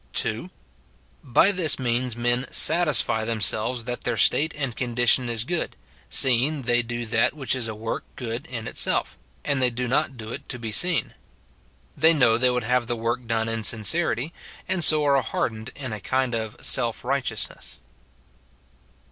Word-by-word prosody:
[2.] - - -1 0.7
Bj 145 +10 +3
this 175 -6 +2
means 125 -1 -2
men 120 +2 -1
satisfy 150 -9 +4
themselves 115 +2 0
that 125 +1 -6
their - - -2
state 160 +2 +3
and 135 -5 -4
condition 120 0 +2
is 115 -2 -1
good, 170 +6 -4 0.3
seeing 135 +3 +3
they 120 0 +1
do 120 0 -5
that 115 +5 0
which 140 -3 -2
is 120 -3 -1
a 110 - -6
work 110 +1 -5
good 125 +2 -6
in 115 -4 -6
itself, - - +1 0.3
and 140 -2 -1
they 125 - +3
do 125 +1 -4
not 135 +1 -1
do 110 0 -8
it - - -9
to - - -3
be 115 -2 -6
seen. 175 +9 +2 0.8
They 160 +1 +4
know 120 -5 +3
they 125 0 +3
would 125 -1 -2
have 125 0 0
the 120 - -2
work 120 +1 -4
done 115 -1 -1
in 115 0 -3
sincerity, 130 - +1 0.3
and 185 -2 +1
so 155 -1 +7
are 140 -1 +3
hardened 110 -1 -4
in 130 -5 -6
a 105 - -6
kind 130 +3 -2
of 110 -2 -4
self 115 0 0
righteousness. 130 -4 -3
120 Hz, 170 wpm, -23 LUFS, 115-135 Hz, 0.8 s, so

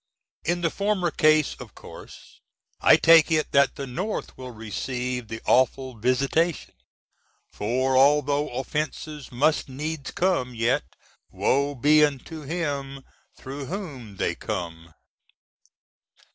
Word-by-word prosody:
In 175 +2 -1
the 165 -2 +1
former 200 -4 0
case 155 -1 +3
of - - -11
course - - -13 0.4
I - - +7
take 165 -1 +6
it 155 -1 +1
that 140 0 +3
the 140 - -5
North 180 - -4
will 130 -1 -8
receive 125 +2 -4
the 110 +1 -7
awful 130 0 +2
visitation, 135 +8 0 0.8
for 130 +5 0
although 145 +2 +3
offences 150 +2 -4
must 145 +4 +1
needs 150 +2 -5
come, 170 -10 0
yet, 115 +2 +1 0.5
woe 140 +1 0
be 150 +4 +5
unto 150 +2 -2
him 140 -3 -4 0.3
through 135 +1 -7
whom 135 - -7
they - - 0
come! 85 -2 -6
140 Hz, 115 wpm, -25 LUFS, 125-155 Hz, 0.8 s, I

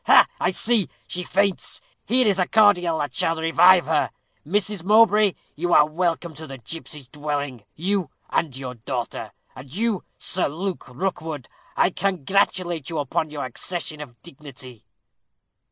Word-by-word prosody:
"Ha! - - +8
I - - +2
see; 215 +2 +1 0.2
she 180 - -3
faints. 195 +1 0 0.3
Here 255 +1 +4
is 200 -3 +3
a 180 - +2
cordial 180 -6 +4
that 145 -4 -3
shall 165 +5 +1
revive 175 +3 +6
her. 155 -1 +1 0.3
Mrs. 200 +2 0
Mowbray, 210 0 +5 0.2
you 175 +3 0
are 150 - +7
welcome 170 +1 -1
to 155 +2 -8
the 135 -1 -8
gipsies' 150 +2 -8
dwelling 145 -4 -4
you 185 -1 -1 0.2
and 145 -6 0
your 130 -2 -5
daughter. 120 +1 -5 0.2
And 130 0 -11
you, 215 +2 -1
Sir 185 - 0
Luke 180 +6 -4
Rookwood, 155 -2 -4 0.3
I - - +4
congratulate 180 -3 0
you 165 - -4
upon 150 +2 -1
your 150 -2 -4
accession 155 +4 -5
of 125 -5 -11
dignity." 130 -7 -12
165 Hz, 150 wpm, -23 LUFS, 145-190 Hz, 0.3 s, Ha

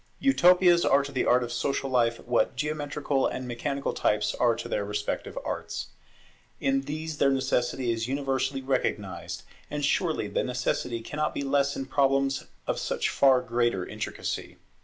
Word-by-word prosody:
Utopias 180 -8 +5
are 140 0 +4
to 140 - -6
the 130 - 0
Art 125 0 +4
of 120 - -5
social 135 +2 -1
life 120 -3 +2
what 120 +1 +1
geometrical 145 -1 -1
and 130 0 -4
mechanical 140 +3 -2
types 105 -1 +1
are 120 -2 +2
to 115 - -6
their 105 - -1
respective 105 0 -3
arts. - - -4 0.7
In 135 0 +1
these 155 0 -4
their 140 - +5
necessity 130 -2 0
is 115 0 -2
universally 135 0 -1
recognized; 130 -1 -2 0.3
and 145 -1 -1
surely 160 - +1
the 100 - -1
necessity 125 -1 -1
cannot 150 +6 -2
be - - -2
less 140 0 +1
in 135 - -3
problems 135 0 +1 0.2
of - - -1
such - - -1
far 130 -2 +4
greater 120 -6 0
intricacy. - - -5
135 Hz, 160 wpm, -27 LUFS, 120-140 Hz, 0.7 s, Utopias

